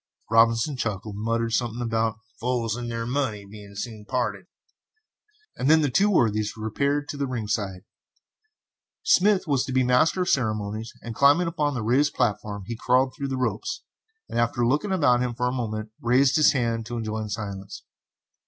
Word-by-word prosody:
Robinson 115 +5 +4
chuckled 105 -3 -3
and 105 +2 -6
muttered 115 0 0
something 120 -1 -1
about 115 -1 0 0.2
"fools 120 -2 -1
and 120 -1 -5
their 115 0 -3
money 120 -5 -2
being 100 0 -12
soon 110 0 -6
parted," 105 -5 -2 1.1
and 135 - 0
then 160 0 +6
the 145 -3 +1
two 200 +9 +3
worthies 110 - +1
repaired 140 +7 -1
to 145 - -4
the 140 -1 -1
ringside. 105 -6 -3 1.2
Smith 200 - +4
was 140 -5 +1
to - - -5
be 130 0 +3
Master 125 +9 +3
of - - +1
the - - +2
Ceremonies, 110 -2 -1
and 115 - -5
climbing 145 +8 +4
upon 150 -4 -1
the 120 - -2
raised 135 +7 +2
platform 105 -4 -1
he 115 - -5
crawled 130 +3 +2
through 140 - -3
the 135 -1 -3
ropes, 365 - -2 0.4
and - - -2
after 120 +1 +1
looking 150 - +1
about 145 -10 +3
him 125 -1 -2
for 125 0 -1
a - - 0
moment, 110 -3 -4
raised 130 +4 +3
his 155 -1 +5
hands 115 -4 -1
to 120 0 -4
enjoin 110 -1 -3
silence. 100 -2 -6
120 Hz, 180 wpm, -25 LUFS, 110-135 Hz, 1.2 s, then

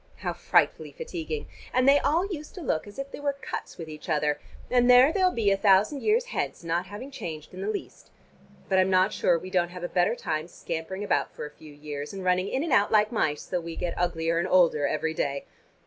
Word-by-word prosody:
How - - -3
frightfully - - +1
fatiguing! 450 -2 -5 0.3
And 255 +1 +2
they 280 +1 +7
all 320 +7 +2
used 315 -7 -7
to 365 - -7
look 205 - -1
as 205 - -12
if 275 0 -5
they - - -7
were 285 -1 -1
cuts - - -6
with 165 - -7
each 155 +2 -9
other, 150 -2 +1 0.3
and 245 0 +4
there 250 +5 +7
they'll 375 -2 +4
be 220 - +1
a 195 - +3
thousand 205 +7 +4
years 450 +3 +2
hence, - - -2
not 170 +2 -1
having 210 +8 -8
changed 165 - -7
in 185 - -7
the 200 - -2
least. 215 - -6 0.6
But 190 -1 +3
I'm 185 0 +3
not 185 +2 +3
sure 175 - +2
we 185 +2 -8
don't 175 -2 +2
have 180 0 -9
the - - -1
better 180 +6 +2
time 155 -7 -3
scampering 175 +3 -5
about 205 - 0
for - - -5
a 150 - -8
few 155 0 -14
years, 145 +1 -6
and 195 -1 -6
running 180 +1 +2
in 265 +7 -1
and 325 -5 -1
out 205 -5 +4
like 215 0 +4
mice, 155 -10 0
though 180 -2 -2
we 165 0 -7
get 175 - -2
uglier 165 -1 0
and 175 - 0
older 170 -6 +4
every 160 +1 -1
day. 140 -2 -2
190 Hz, 235 wpm, -27 LUFS, 165-255 Hz, 0.6 s, they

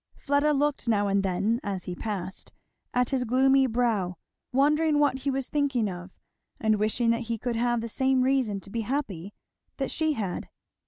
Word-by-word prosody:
Fleda 285 +1 +1
looked 290 -2 0
now 205 -3 +2
and 200 0 +2
then 200 +5 0
as 195 -3 -4
he 180 - -5
passed 190 -1 -5 0.4
at 250 +1 +1
his 260 -2 +1
gloomy 265 +2 +4
brow, 220 -7 0 0.4
wondering 300 +3 +3
what 290 -3 +2
he 275 +2 -2
was 270 -1 -1
thinking 275 -7 +1
of, 180 -1 -6 0.5
and 215 -1 +2
wishing 230 +2 +2
that 230 - +1
he 230 - 0
could 240 +2 -3
have 240 0 +1
the 230 - -4
same 265 +2 +2
reason 255 -6 +1
to 195 - -12
be 230 - -1
happy 205 - -3 0.4
that 270 - -2
she 315 -1 +1
had. 200 -9 -4
240 Hz, 180 wpm, -27 LUFS, 205-270 Hz, 0.5 s, gloomy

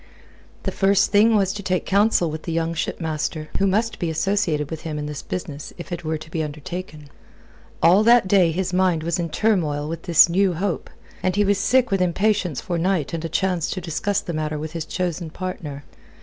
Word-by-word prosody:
The - - -1
first 200 +1 +2
thing 220 +2 +5
was 195 -2 +2
to 205 - -6
take 185 -1 -1
counsel 200 -4 +3
with 155 0 -5
the 165 - -5
young 165 0 -1
shipmaster, 155 -1 -3
who 195 - +3
must 220 +4 0
be 170 - -1
associated 160 -3 0
with 160 - -5
him 155 -2 -4
in 150 - -3
this 150 -2 -5
business 150 -5 -6
if 175 - -9
it 170 -1 -4
were 160 0 -1
to 160 +1 -12
be 165 - -1
undertaken. 155 +1 -6 0.8
All 180 +5 +6
that 235 -4 +6
day 185 -4 +4
his 185 +2 -2
mind 180 -3 +2
was 170 +1 -1
in 170 -1 -2
turmoil 155 -7 0
with 165 +1 -5
this 170 -3 +6
new 185 +2 +2
hope, 185 +1 -2 0.3
and 185 -1 0
he 205 0 +3
was 200 0 +2
sick 245 +3 +2
with 195 -1 +1
impatience 180 -3 +1
for 175 -3 -3
night 175 -3 0
and 165 -1 -3
a 165 - -3
chance 180 -1 0
to 185 - -3
discuss 190 +4 -1
the 175 - -5
matter 155 -1 -2
with 155 +1 -5
his 165 -2 -4
chosen 175 -2 -3
partner. 155 -5 -6
175 Hz, 210 wpm, -22 LUFS, 160-195 Hz, 0.8 s, All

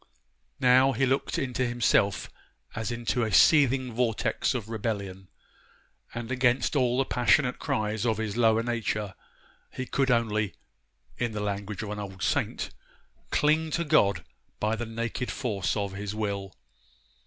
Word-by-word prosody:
Now, 130 +2 +5
he 135 +4 +1
looked 135 +2 0
into 130 -1 -1
himself 120 -4 +1 0.5
as 110 +2 -3
into 120 +1 -1
a 110 -2 0
seething 130 - +4
vortex 115 +1 0
of 115 -4 -3
rebellion; 100 -4 -4 0.9
and 120 +1 -5
against 125 0 +2
all 125 -3 +2
the 135 - +2
passionate 125 +2 +2
cries 110 0 -1
of 110 -3 +1
his 110 -2 -3
lower 115 -1 +3
nature, 110 -4 -2 0.6
he 130 - -5
could 135 +1 0
only 110 -4 +1 0.6
(in 120 -2 -1
the 105 - -3
language 105 0 -3
of 105 - -5
an 105 - -4
old 95 -2 -7
saint) - - -1 0.6
'cling 155 +2 +2
to 170 +2 -1
God 145 -11 +2 0.3
by 110 +1 +1
the 120 +1 -4
naked 115 +2 -3
force 110 -7 -2
of 100 -1 -2
his 100 +1 -5
will. 100 -3 -3
115 Hz, 145 wpm, -27 LUFS, 105-125 Hz, 0.9 s, Now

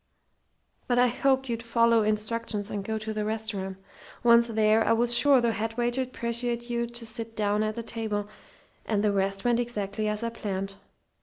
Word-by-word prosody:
"But 245 - +1
I 245 0 +5
hoped 265 +2 +1
you'd 230 -1 -3
follow 230 -1 +3
instructions 215 0 -1
and 200 -1 -3
go 220 +2 -2
to 220 0 -4
the 215 0 -2
restaurant. 210 -3 -3 0.5
Once 235 0 +6
there, 220 -1 +3
I 230 - +3
was 240 +1 +3
sure 275 +2 +6
the 235 -1 +1
head 225 +1 -3
waiter'd 245 +2 -1
persuade 240 0 -2
you 235 0 -1
to 235 0 -4
sit 225 0 -2
down 210 0 +1
at 215 +1 -2
a 235 - -3
table; 215 -3 -3 0.6
and 210 -2 0
the 210 - +3
rest 195 +1 -1
went 240 -1 +3
exactly 215 -3 -2
as 210 +1 -2
I 230 - 0
planned. 195 -3 -4
225 Hz, 185 wpm, -27 LUFS, 210-235 Hz, 0.6 s, Once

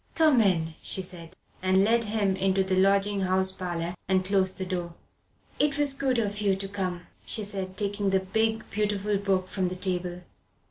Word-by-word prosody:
"Come 310 -7 +5
in," 165 -6 +1
she 190 - 0
said, 175 -2 -7 0.3
and 190 +1 +3
led 230 +2 +2
him 205 -2 0
into 190 0 +1
the 190 0 0
lodging 195 +1 +3
house 190 0 +1
parlour 175 -2 -4 0.2
and 185 -1 +2
closed 190 -1 +1
the 190 - -3
door. 175 -2 -4 0.6
"It 290 -1 +2
was 290 -2 +5
good 270 -2 0
of 205 -2 -1
you 200 -2 +2
to 195 +1 -5
come," 185 -3 -3 0.2
she 215 - -2
said, 190 -2 -2
taking 205 -1 -1
the 190 0 +3
big, 220 +3 0
beautiful 205 0 0
book 195 -2 0
from 185 -2 -1
the 180 - -4
table. 180 -1 -2
195 Hz, 185 wpm, -27 LUFS, 185-205 Hz, 0.6 s, Come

